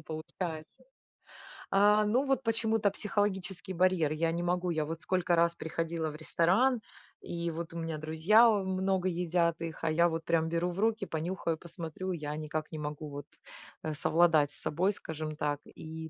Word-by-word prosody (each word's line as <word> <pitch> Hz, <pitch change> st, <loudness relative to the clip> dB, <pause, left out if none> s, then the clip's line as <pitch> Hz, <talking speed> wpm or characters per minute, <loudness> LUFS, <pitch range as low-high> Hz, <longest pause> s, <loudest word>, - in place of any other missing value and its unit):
получается. 160 Hz, -, -6 dB, 0.9 s
А, 210 Hz, +2 st, +5 dB
ну 245 Hz, +7 st, +2 dB
вот 270 Hz, -1 st, +1 dB
почему-то 225 Hz, -2 st, +2 dB
психологический 190 Hz, -2 st, -2 dB
барьер. 180 Hz, -4 st, +2 dB
Я 165 Hz, +1 st, 0 dB
не 170 Hz, +1 st, -2 dB
могу, 180 Hz, +1 st, 0 dB
я 155 Hz, -2 st, 0 dB
вот 165 Hz, +2 st, -5 dB
сколько 180 Hz, -2 st, +1 dB
раз 170 Hz, 0 st, +3 dB
приходила 165 Hz, -1 st, -2 dB
в 150 Hz, -, -8 dB
ресторан 190 Hz, +10 st, +2 dB, 0.4 s
и 170 Hz, 0 st, -3 dB
вот 165 Hz, +1 st, -6 dB
у -, -, -6 dB
меня 165 Hz, -1 st, -3 dB
друзья, 160 Hz, +9 st, +4 dB
э, 205 Hz, -3 st, +2 dB
много 190 Hz, 0 st, 0 dB
едят 170 Hz, -1 st, 0 dB
их, 165 Hz, -1 st, -6 dB
а 160 Hz, -, +2 dB
я 170 Hz, +2 st, +4 dB
вот 165 Hz, 0 st, -3 dB
прям 160 Hz, -1 st, +2 dB
беру 170 Hz, +2 st, 0 dB
в 175 Hz, -, -6 dB
руки, 225 Hz, -1 st, +1 dB
понюхаю, 165 Hz, 0 st, -2 dB
посмотрю, 170 Hz, +2 st, -6 dB
я 150 Hz, -2 st, -4 dB
никак 155 Hz, 0 st, -4 dB
не 155 Hz, -, -5 dB
могу 150 Hz, 0 st, -5 dB
вот, 145 Hz, 0 st, -7 dB, 0.6 s
э, 155 Hz, -, -2 dB
совладать 155 Hz, -1 st, +3 dB
с -, -, -14 dB
собой, 180 Hz, +6 st, +1 dB
скажем 155 Hz, -3 st, -5 dB
так, 145 Hz, -1 st, -1 dB
и 160 Hz, 0 st, -8 dB
170 Hz, 175 wpm, -31 LUFS, 160-190 Hz, 0.9 s, А